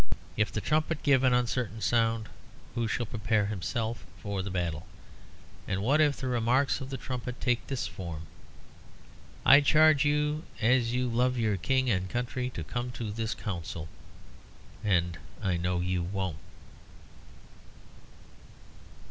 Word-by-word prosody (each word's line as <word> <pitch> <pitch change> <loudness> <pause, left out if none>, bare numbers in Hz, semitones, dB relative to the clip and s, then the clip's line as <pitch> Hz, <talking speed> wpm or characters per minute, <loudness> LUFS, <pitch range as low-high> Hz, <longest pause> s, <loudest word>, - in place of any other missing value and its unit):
If 105 -1 +1
the 110 - -2
trumpet 155 +3 0
give 140 -3 +5
an 130 - +5
uncertain 125 -2 0
sound, 115 -1 +1 0.5
who 115 -1 0
shall 120 +2 -1
prepare 110 -1 0
himself 110 +3 -3 0.2
for 100 -2 -3
the 95 - -4
battle? 85 -4 -2 0.8
And 95 0 -1
what 145 +7 +4
if 145 -2 +3
the 135 - -4
remarks 125 +3 +2
of 135 - -6
the 135 - -4
trumpet 125 -1 -5
take 120 -2 0
this 135 -2 -2
form, 85 -4 -6 1.2
"I 140 +2 +9
charge 155 0 +5
you 150 +1 +1 0.2
as 120 0 +3
you 125 +1 0
love 125 +2 +1
your 110 -3 +1
King 130 +8 +1
and 95 -2 0
country 125 +2 -2
to 85 -10 -6
come 120 +8 -3
to 115 -2 -4
this 110 +1 -2
Council. 85 -5 -5 1.0
And 90 -5 +1 0.2
I 90 -3 0
know 90 0 0
you 90 0 0
won't." 95 -3 -3
115 Hz, 140 wpm, -29 LUFS, 95-130 Hz, 1.2 s, I